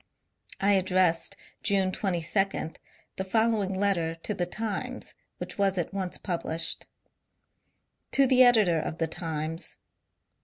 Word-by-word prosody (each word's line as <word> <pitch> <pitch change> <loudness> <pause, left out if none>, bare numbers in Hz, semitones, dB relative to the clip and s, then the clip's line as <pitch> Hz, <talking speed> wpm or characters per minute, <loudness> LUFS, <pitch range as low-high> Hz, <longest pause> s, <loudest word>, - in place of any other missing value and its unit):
I 200 +1 +3
addressed, 185 -3 +2 0.2
June 195 -2 +2
22, 185 -1 0 0.5
the 190 - -1
following 210 -1 +1
letter 185 -5 +1
to 165 +6 -4
the 175 -3 -2
^ - - -18
Times,'' 215 -2 -4 0.2
which - - -7
was 195 -1 +2
at 175 +2 -2
once 190 -2 -2
published: 165 -3 -2 0.6
— - - -49
To 275 - +6
the 255 -1 +5
Editor 215 -9 +5
of 160 - -4
the 165 - +1
Times. 160 0 -4
190 Hz, 130 wpm, -28 LUFS, 165-200 Hz, 0.6 s, To